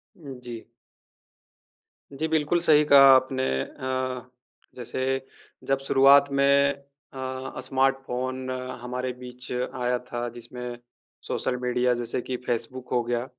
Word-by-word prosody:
जी। 125 - -9 1.5
जी, 155 +4 -2
बिल्कुल। 160 +2 +1
सही 150 -3 +5
कहा 140 -2 +8
आपने 130 0 +1 0.2
अ, 130 -1 -4 0.5
जैसे 125 +1 -5 0.7
जब 135 0 +2
शुरुआत 140 +1 +6
में 140 0 +4 0.4
अ, 130 0 -5
स्मार्टफ़ोन 130 -1 -1 0.3
हमारे 125 +1 -3
बीच 125 0 -10
आया 125 0 -1
था 120 0 -2
जिसमें 120 0 -7 0.5
सोशल 125 - -1
मीडिया 125 0 +1
जैसे 120 +1 -3
कि 125 0 -4
फ़ेसबुक 120 +2 -3
हो 125 -1 +2
गया। 120 +1 -2
130 Hz, 110 wpm, -26 LUFS, 125-135 Hz, 1.5 s, कहा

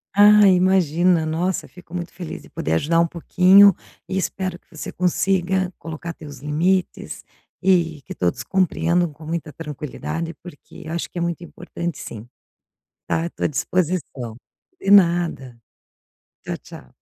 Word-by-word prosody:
Ah, 210 0 +8
imagina. 180 -2 +3
Nossa, 170 +4 -1
fico 180 -2 -17
muito 175 -1 -5
feliz 175 -4 -7
de - - -16
poder 80 - -2
ajudar 165 - +2
um 170 - +4
pouquinho 185 +4 +6 0.3
e 190 - -4
espero 185 -1 -2
que - - -42
você 160 -4 -7
consiga 185 0 0
colocar 165 +1 -6
teus 145 -4 -11
limites, 170 +6 -1 0.4
e 170 -5 +2
que - - -8
todos 85 -1 -1
compreendam 175 -2 +1
com 155 +2 -14
muita 165 -1 -4
tranquilidade, 160 +2 -5
porque 165 -2 -12
acho 170 +1 -3
que - - -10
é 175 - -1
muito 170 0 -2
importante 170 0 -6
sim. 110 +1 -8 0.8
Tá, 165 - 0
eu 170 - -3
tô - - -5
à - - +5
disposição. 150 -7 -2 0.4
De 195 - -1
nada. 170 -10 +3 0.8
Tchau, - - -4
tchau. 65 - -14
170 Hz, 145 wpm, -22 LUFS, 155-185 Hz, 0.8 s, Ah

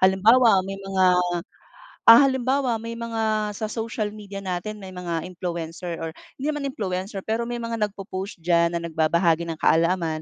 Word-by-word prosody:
Halimbawa 200 +3 +5
may 195 0 -5
mga, 195 -1 0 1.1
ah, 230 +1 +11
halimbawa 260 -2 +1
may 230 +1 -6
mga 220 -2 -1
sa 220 - -2
social 220 -1 -3
media 205 -2 -9
natin 190 +3 -4
may 190 -2 -10
mga 170 -2 -3
influencer 170 -1 -5
or 165 0 -4 0.3
hindi 270 - -5
naman 295 -2 -2
influencer. 195 -3 -4
Pero 225 +2 -1
may 240 - -3
mga 230 -1 -4
nag-popost 195 0 -7
diyan 170 0 +2
na - - -5
nagbabahagi 170 +1 +1
ng 165 - -4
kaalaman 165 -1 +2
195 Hz, 160 wpm, -24 LUFS, 175-225 Hz, 1.1 s, ah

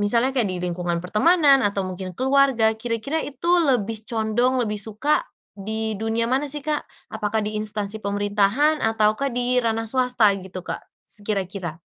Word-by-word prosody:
misalnya 235 +6 +2
kayak 245 -6 +1
di 185 - -3
lingkungan 175 -1 -2
pertemanan, 280 - +4
atau 200 -3 0
mungkin 185 -1 -6
keluarga, 265 -4 +3
kira-kira 230 +7 -2
itu 290 +4 -5
lebih 225 -7 +1
condong, 240 +3 +1
lebih 210 -1 -3
suka 225 - 0 0.2
di 220 +2 -3
dunia 225 +1 0
mana, 265 +5 0
sih, 290 0 -3
Kak? 300 -1 -2 0.2
Apakah 215 0 -1
di 210 - -3
instansi 215 0 -3
pemerintahan 205 +9 +1
ataukah 225 +4 +1
di 245 0 +1
ranah 225 -1 -1
swasta, 245 -3 +3
gitu, 185 -1 -8
Kak? - - -4 0.2
Se - - -6
kira-kira. 190 -5 -4
220 Hz, 155 wpm, -23 LUFS, 205-255 Hz, 0.2 s, pertemanan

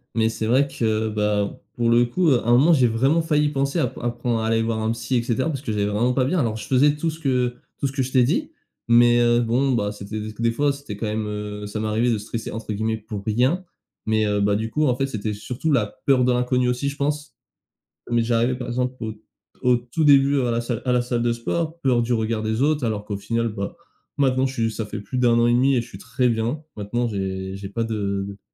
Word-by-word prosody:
mais 110 0 +2
c'est 110 -1 -3
vrai 130 +5 +3
que, 110 -3 -1
bah, 105 -1 -1 0.2
pour 120 -1 +1
le 120 +1 +5
coup 165 +7 +1
à 120 -4 +2
un - - +4
moment 145 +8 +6
j'ai 130 -5 +4
vraiment 135 +9 +2
failli 150 -2 +2
penser 140 +3 -1
à - - +2
p - - -10
à 120 - 0
prendre 120 -1 -2
à 110 - -2
aller 115 0 +2
voir 115 0 -1
un 110 - +1
psy 115 +3 -2
et 120 - +2
cetera 130 +5 0
parce 140 -4 -3
que 110 - -3
j'allais 100 -1 0
vraiment 115 +5 +1
pas 130 -1 +2
bien, 180 +7 0
alors 115 -7 0
je 105 - -8
faisais 145 +3 +4
tout 165 +2 -1
ce 160 +1 -7
que 125 -4 0 0.2
tout 140 - 0
ce - - -5
que 135 -1 -1
je 130 - -5
t'ai 130 - +4
dit, 180 - 0 0.4
mais 120 0 +6
heu, 120 0 +4
bon 125 +4 +1
bah, 105 -4 0
c'était 105 +1 -6
des 110 - -5
c 110 - -11
des 115 0 +1
fois 145 +5 +1
c'était 140 -6 -7
quand 105 +2 -4
même, 105 0 -2
heu 105 0 -5
ça 105 +1 -5
m'arrivait 110 +3 +1
de 110 - +1
«stresser» 115 +2 -5
entre 110 0 -5
guillemets 110 +2 -1
pour 105 -2 -7
rien, 130 - +1 0.4
mais 110 -1 +1
heu 105 0 +1
bah, 100 0 +2
du 110 +1 -2
coup 150 +6 +1
en 125 -4 +2
fait 135 +1 -1
c'était 110 -4 -3
surtout 125 +9 -3
la 120 -7 +2 0.2
peur 130 -2 +4
de 125 - +3
l'inconnu 125 0 +1
aussi 125 +3 -1
je 140 0 -4
pense, 150 +1 -2 0.8
mais 120 -1 +2
j'arrivais 120 +2 +1
par 125 -1 -6
exemple 125 +1 -1
au 110 - -3 0.5
au 125 -1 +4
tout 120 +6 -2
début 140 -1 +5
à 125 -2 0
la 115 0 0
salle 120 -1 -3
à 125 - +2
la 125 0 +3
salle 120 -1 -2
de 120 0 +2
sport. 165 +7 -3
Peur 125 -3 +3
du 120 +1 -1
regard 110 -1 -1
des 110 +3 -1
autres, 145 -2 +2
alors 105 -2 -2
qu'au 105 -1 -4
final, 115 +3 -1
bah, 100 -2 -5 0.4
maintenant 130 -1 +2
je 130 - -4
suis 115 -2 0
ça 110 -1 -4
fait 105 0 -6
plus 105 +5 -5
d'1 120 -2 +4
an 120 0 +4
et - - +3
1/2 130 +3 +3
et 120 - +1
je 115 - -13
suis 95 - -10
très 125 +4 0
bien. 120 +6 -1
Maintenant, 120 +4 -2
j'ai 95 -2 -4
j'ai 100 0 -7
pas 110 +4 -3
de 100 -2 -3
120 Hz, 265 wpm, -23 LUFS, 110-130 Hz, 0.8 s, moment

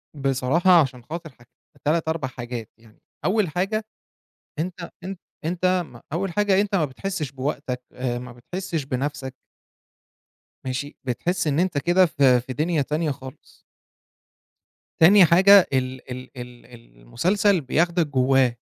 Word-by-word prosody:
بصراحة، 140 +6 +3
عشان 125 -4 -3
خاطر 165 +3 -7
حاجت 120 -2 -22 0.4
3 160 +2 +1
4 160 -4 -1
حاجات 120 -3 -7
يعني، 110 -1 -22 0.3
أول 200 -2 +2
حاجة 195 +7 -1 0.7
أنت 170 +1 -4
أن 190 +1 -5 0.3
أنت 175 +3 -1 0.2
م 120 - -14
أول 180 +2 -2
حاجة 200 0 +3
أنت 205 0 -1
ما 170 -6 +3
بتحسش 150 +1 -4
بوقتك، 130 -1 -4
آآ، 125 -1 -3
ما 125 0 -9
بتحسش 165 +6 -5
بَنفسك 135 0 -3 1.3
ماشي؟ 130 +3 -4
بتحس 175 +8 -1
إن 150 +2 +1
أنت 180 -4 0
كده 175 +6 +4
في 135 -6 +3
في 130 +2 -7
دنيا 155 +2 0
تانية 150 +2 -1
خالص. 130 +1 -11 1.4
تاني 190 +3 +8
حاجة 190 +3 +7
ال 130 -1 -2
ال 130 0 -7
ال 125 0 -10 0.4
المسلسل 185 - +1
بياخدك 165 +4 +1
جواه، 130 -2 +2
150 Hz, 135 wpm, -23 LUFS, 130-175 Hz, 1.4 s, تاني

